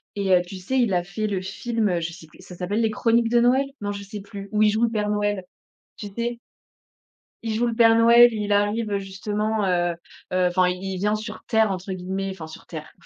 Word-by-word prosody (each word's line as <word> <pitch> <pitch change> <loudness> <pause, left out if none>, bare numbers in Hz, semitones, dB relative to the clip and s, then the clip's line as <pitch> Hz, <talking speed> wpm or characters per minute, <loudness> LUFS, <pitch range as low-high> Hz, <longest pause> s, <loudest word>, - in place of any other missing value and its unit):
et 195 -2 -1
heu, 175 - +3
tu 190 +2 -8
sais, 260 +9 -2
il 225 -6 +2
a 175 -1 +1
fait 195 +4 -4
le 195 -3 -1
film, 215 +2 -2
heu, 175 -1 0
je 165 +1 -4
sais 160 -2 -13
plus, - - -21
ça 180 - -11
s'appelle 200 +6 -1
les 220 -1 +1
Chroniques 230 +1 +2
de 240 0 +4
Noël? 255 +3 +3 0.2
Non 205 0 -2
je 200 0 -6
sais 205 0 -8
plus, 200 0 -9
où 215 0 +1
il 215 - +6
joue 220 +3 +1
le 230 - +2
Père 210 -2 -1
Noël. 205 -2 0 0.5
Tu 210 - -7
sais? 235 0 -2 1.0
Il 225 -1 -2
joue 240 +2 +1
le 230 - -2
Père 225 -1 +6
Noël, 235 +1 +7
il 210 -1 -3
arrive, 205 +1 +1
justement, 205 +2 -2
heu, 175 -1 +1 0.4
heu, 185 -1 +3
enfin, 180 0 +2
«il 185 +1 -4
vient 210 +3 +1
sur 215 0 -7
terre», 220 -3 +3
entre 190 +1 -5
guillemets, 190 +1 -3
enfin 165 -4 -8
sur 160 - -12
terre, 155 -2 -8
205 Hz, 235 wpm, -24 LUFS, 185-225 Hz, 1.0 s, Noël